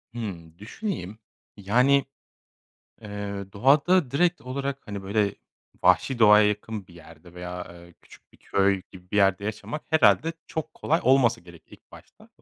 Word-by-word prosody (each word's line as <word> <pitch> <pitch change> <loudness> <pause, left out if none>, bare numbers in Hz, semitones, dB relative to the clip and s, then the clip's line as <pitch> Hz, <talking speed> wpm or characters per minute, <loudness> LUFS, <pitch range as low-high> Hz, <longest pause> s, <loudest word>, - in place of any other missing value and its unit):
Hımm, 85 -7 -7
düşüneyim. 110 - -6 0.4
Yani, 125 +8 +3 1.0
ııı, 100 -1 -6
doğada 140 - +3
direkt 175 +5 +1
olarak, 140 +2 -4
hani, 100 -2 -6
böyle, 100 +1 0 0.5
vahşi 130 -3 +3
doğaya 105 -1 +6
yakın 105 -1 -4
bir 90 - -18
yerde 80 +1 -16
veya, 90 0 -7
aaa, 85 0 -14
küçük - - -20
bir - - -21
köy 100 -1 +1
gibi 90 -1 -15
bir - - -2
yerde 100 -1 +3
yaşamak 110 +8 -5
herhâlde 155 +2 +4
çok 160 - -5
kolay 165 +3 0
olmasa 125 -3 +3
gerek 85 -2 -16
ilk - - -19
başta. - - -17
105 Hz, 145 wpm, -25 LUFS, 95-135 Hz, 1.0 s, doğaya